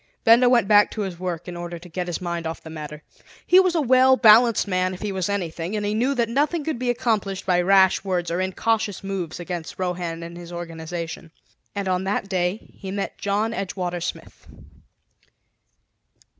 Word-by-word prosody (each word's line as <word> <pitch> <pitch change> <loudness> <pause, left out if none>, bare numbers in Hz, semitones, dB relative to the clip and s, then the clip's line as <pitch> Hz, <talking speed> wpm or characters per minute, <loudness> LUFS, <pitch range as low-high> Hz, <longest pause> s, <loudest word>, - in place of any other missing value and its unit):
Benda 235 +2 +6
went 235 -5 +3
back 210 0 +6
to 215 - -5
his 185 -4 -4
work 180 -2 -4
in 175 - -6
order 175 0 -6
to 170 +2 -12
get 180 +1 -4
his 175 - -3
mind 170 -2 -3
off 160 - -6
the 160 - -9
matter. 150 -1 -8 0.4
He 365 - +6
was 370 -2 +3
a 325 - +2
well 260 0 +5
balanced 230 -1 +6
man 185 -1 0
if 185 - -10
he 210 - -2
was 190 0 -2
anything; 175 -1 -3
and 210 -1 -2
he 205 - 0
knew 250 +6 +1
that 235 -2 +1
nothing 295 +7 0
could 305 -5 -3
be 250 -1 -1
accomplished 220 -6 -1
by 180 -1 +3
rash 190 +1 +4
words 180 -3 -1
or 175 +2 0
incautious 205 +2 -1
moves 190 -5 -4
against 175 -2 -6
Rohan 175 -2 -3
and 170 0 -8
his 175 0 -10
organization. 165 -1 -6 0.5
And 200 -1 -3
on 185 0 0
that 195 0 -1
day 185 +2 -2
he 195 - -7
met 200 +1 -4
John 210 +3 0
Edgewater 180 -4 -3
Smith. 175 - -7
190 Hz, 195 wpm, -23 LUFS, 175-220 Hz, 0.5 s, Benda